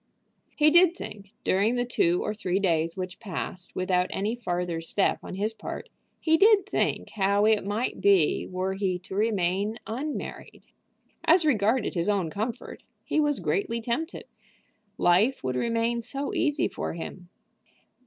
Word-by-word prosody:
He 305 0 +5
did 345 +1 +6
think, 200 - -9
during 205 +6 +2
the 245 0 0
two 175 -7 +1
or 210 - -2
three 190 -4 -1
days 165 -3 +1
which 185 0 -5
passed 185 -3 -5
without 185 0 +1
any 205 +3 -1
farther 175 -7 -2
step 190 +4 0
on - - -7
his 210 +3 -1
part, - - -7 0.3
he 320 0 +3
did 405 0 +5
think 415 - -1
how 200 0 +2
it 215 -1 +3
might 210 +5 -2
be 195 -6 +3
were 185 +1 -2
he 190 -2 -1
to 180 - -11
remain 200 0 0
unmarried. 275 +7 -5 0.6
As 335 0 +5
regarded 230 -3 +2
his 170 +2 0
own 190 -6 0
comfort, 220 +5 -5 0.2
he - - 0
was 295 -2 +2
greatly 200 +9 -1
tempted. 250 +9 -3 0.7
Life 195 - +3
would 130 -1 -1
remain 230 - 0
so 275 +4 -4
easy 295 -2 +1
to - - -6
him! 175 +2 -7
205 Hz, 155 wpm, -27 LUFS, 185-245 Hz, 0.7 s, did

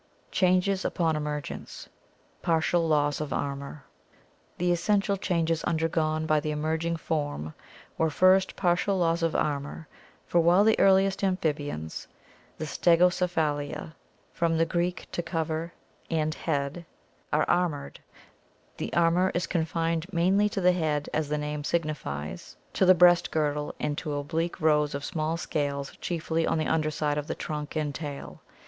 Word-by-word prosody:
Changes 185 +1 +2
upon 165 -3 0
Emergence 150 -1 -5 0.5
Partial 165 +1 +2
Loss 145 -2 +1
of 150 - -4
Armor. 140 0 -4 0.4
— - - -36
The 175 0 +1
essential 200 +3 +1
changes 165 -4 0
undergone 160 -1 0
by 155 -1 +3
the 155 - -3
emerging 160 +2 -1
form 145 - -3 0.5
were, 160 - +3
first, 185 +4 +4
partial 185 +2 +1
loss 170 -1 +1
of 165 -1 0
armor, 150 +2 -2 0.4
for 175 - +2
while 175 +4 +5
the 220 +1 +3
earliest 195 0 +4
amphibians, 145 - -2 0.5
the 155 - -4
Stegocephalia 165 -3 +1 0.5
(Gr. 170 - +3
orey&v, 170 +2 0
to - - -2
cover, 165 -1 -3 0.4
and 155 -1 0
K€<f>a\r}, - - -12
head) 150 +2 -1 0.5
are 150 - +2
armored, 170 -5 0 0.8
the - - -4
armor 170 +2 +3
is 175 -1 0
confined 165 +1 -1
mainly 190 +4 +3
to 200 - -3
the 180 0 +5
head 155 -4 -1
as 155 -1 -1
the 150 - 0
name 150 0 -3
signifies, 85 - -3 0.2
to 190 - +2
the 185 - +8
breast 175 0 +5
girdle, 150 -1 -1
and 145 - -1
to 150 - -4
oblique 165 +5 -2
rows 150 -2 +2
of 140 0 -4
small 160 -1 -2
scales, 140 -4 -3
chiefly 165 -1 -1
on - - +1
the 155 - 0
under 155 -1 +1
side 150 -1 -1
of 145 - -6
the - - -3
trunk 150 0 -5
and 150 -2 -1
tail. 145 -2 -7
160 Hz, 150 wpm, -27 LUFS, 150-175 Hz, 0.8 s, the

